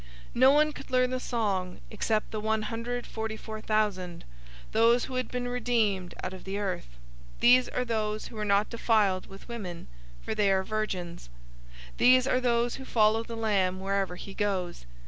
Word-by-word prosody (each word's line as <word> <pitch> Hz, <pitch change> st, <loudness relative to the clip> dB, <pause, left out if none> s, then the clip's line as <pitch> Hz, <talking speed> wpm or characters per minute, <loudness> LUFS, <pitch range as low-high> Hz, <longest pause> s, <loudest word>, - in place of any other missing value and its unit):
No 260 Hz, +2 st, +6 dB
one 300 Hz, +1 st, +3 dB
could 275 Hz, -, -10 dB
learn 255 Hz, 0 st, +2 dB
the 255 Hz, -, -1 dB
song 200 Hz, -8 st, -2 dB
except 215 Hz, 0 st, -1 dB
the 215 Hz, -, -3 dB
one 220 Hz, 0 st, 0 dB
hundred 235 Hz, +2 st, -3 dB
forty 220 Hz, 0 st, -4 dB
four 220 Hz, 0 st, -7 dB
thousand, 200 Hz, -6 st, -1 dB, 0.5 s
those 230 Hz, +2 st, +4 dB
who 265 Hz, -, -8 dB
had 255 Hz, -2 st, -1 dB
been 250 Hz, 0 st, -3 dB
redeemed 225 Hz, -7 st, 0 dB
out 185 Hz, -, -3 dB
of 185 Hz, -, -10 dB
the 195 Hz, +1 st, -4 dB
earth. 180 Hz, -, -4 dB, 0.4 s
014:004 -, -, -21 dB
These 250 Hz, +1 st, +6 dB
are 250 Hz, -, -2 dB
those 215 Hz, -2 st, -2 dB
who -, -, -10 dB
were 215 Hz, -, -3 dB
not 205 Hz, 0 st, +2 dB
defiled 215 Hz, -5 st, +2 dB
with 195 Hz, 0 st, -13 dB
women, 200 Hz, -8 st, -6 dB, 0.4 s
for -, -, -3 dB
they 210 Hz, -2 st, +2 dB
are 190 Hz, 0 st, +2 dB
virgins. 185 Hz, -, -4 dB, 0.7 s
These 255 Hz, 0 st, +6 dB
are 255 Hz, -1 st, +1 dB
those 240 Hz, -1 st, +1 dB
who 265 Hz, -, -8 dB
follow 220 Hz, -3 st, +3 dB
the 230 Hz, 0 st, -7 dB
Lamb 195 Hz, -4 st, +1 dB
wherever 195 Hz, -1 st, -1 dB
he 195 Hz, +2 st, -9 dB
goes. 185 Hz, -, -2 dB
215 Hz, 185 wpm, -28 LUFS, 195-240 Hz, 0.7 s, No